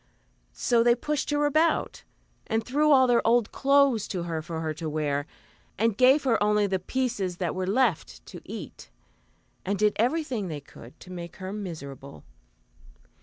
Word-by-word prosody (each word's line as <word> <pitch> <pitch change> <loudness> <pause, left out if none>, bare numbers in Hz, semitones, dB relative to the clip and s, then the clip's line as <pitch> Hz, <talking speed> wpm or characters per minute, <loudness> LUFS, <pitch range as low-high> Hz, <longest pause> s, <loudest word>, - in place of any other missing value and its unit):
So 235 -2 +2
they 240 0 +4
pushed 295 +3 -2
her 295 0 +1
about, 310 +3 +1 0.4
and 225 0 -1
threw 300 +4 +2
all 260 -2 +6
their 245 -2 +3
old 235 -1 +3
clothes 275 -5 +3
to 180 -3 -3
her 165 -2 -3
for 165 0 -6
her 160 -1 -2
to 155 +1 -5
wear, 145 -1 -2 0.5
and 225 +1 +1
gave 260 +5 +5
her 240 -6 +1
only 210 0 +3
the 190 -1 -1
pieces 205 -4 -2
that 175 -4 -2
were 185 0 -3
left 220 -4 0
to - - -10
eat, - - -9 0.7
and 200 +1 -1
did 210 0 +2
everything 245 - 0
that 165 - -5
they 145 - -7
could 125 -3 -15
to 185 - -12
make 170 -2 -8
her 190 0 -7
miserable. 140 - -8
210 Hz, 170 wpm, -26 LUFS, 175-255 Hz, 0.7 s, all